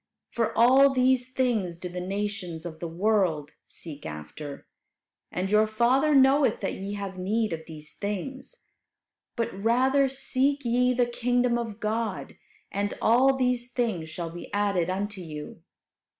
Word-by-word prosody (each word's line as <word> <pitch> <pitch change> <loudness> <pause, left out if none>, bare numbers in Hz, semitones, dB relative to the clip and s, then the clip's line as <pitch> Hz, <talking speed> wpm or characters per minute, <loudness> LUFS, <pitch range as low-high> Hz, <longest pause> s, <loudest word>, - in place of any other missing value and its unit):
For 230 -2 -1
all 265 +4 +6
these 255 0 +2
things 220 -10 0
do 180 - -6
the 180 0 -5
nations 190 -3 -4
of 160 -2 -7
the 170 - -4
world 170 -4 +1 0.2
seek 150 -4 -8
after, 75 - -8 0.7
and 185 +2 -2
your 215 +1 +5
Father 255 +7 +3
knoweth 270 -2 +5
that 195 - -1
ye 195 +1 -5
have 200 -2 -5
need 215 +1 0
of 160 -1 -6
these 155 -2 -8
things. 260 - -5 0.7
But 230 -2 -2
rather 255 +7 +2
seek 270 +1 0
ye 250 +1 +2
the 245 0 +3
kingdom 245 0 +1
of 225 -3 -5
God; 215 -2 -2 0.4
and 205 +1 -2
all 260 +4 +4
these 250 -1 0
things 220 -10 -1
shall 165 +1 -5
be 175 - -9
added 200 -4 +1
unto 200 +1 -3
you. 155 -1 -8
215 Hz, 150 wpm, -27 LUFS, 180-250 Hz, 0.7 s, all